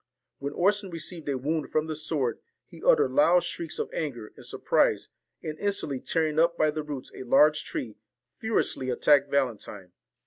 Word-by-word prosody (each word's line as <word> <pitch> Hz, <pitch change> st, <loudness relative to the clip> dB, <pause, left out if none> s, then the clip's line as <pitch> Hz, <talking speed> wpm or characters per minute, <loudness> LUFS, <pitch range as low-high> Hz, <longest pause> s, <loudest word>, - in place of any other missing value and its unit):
When 140 Hz, +1 st, -4 dB
Orson 200 Hz, +3 st, +1 dB
received 165 Hz, -2 st, -4 dB
a 135 Hz, -, 0 dB
wound 150 Hz, +4 st, -2 dB
from 155 Hz, 0 st, +1 dB
the 160 Hz, -1 st, -4 dB
sword, 150 Hz, -5 st, -1 dB, 0.3 s
he -, -, -14 dB
uttered 475 Hz, -3 st, +4 dB
loud 180 Hz, -12 st, +5 dB
shrieks 165 Hz, -2 st, -5 dB
of -, -, -4 dB
anger 120 Hz, -9 st, -4 dB
and -, -, -13 dB
sur -, -, -5 dB
prise, -, -, +2 dB, 0.3 s
and 155 Hz, -1 st, -5 dB
instantly 195 Hz, -10 st, -1 dB
tearing 160 Hz, 0 st, 0 dB
up 170 Hz, +1 st, +3 dB
by 155 Hz, 0 st, +3 dB
the 155 Hz, +1 st, -3 dB
roots 145 Hz, -3 st, -7 dB
a -, -, -9 dB
large 150 Hz, +4 st, +4 dB
tree, 110 Hz, -4 st, -5 dB, 0.4 s
furiously 220 Hz, -11 st, -1 dB
attacked 140 Hz, +2 st, +4 dB
Valentine. 110 Hz, -9 st, -2 dB
155 Hz, 175 wpm, -27 LUFS, 135-170 Hz, 0.4 s, loud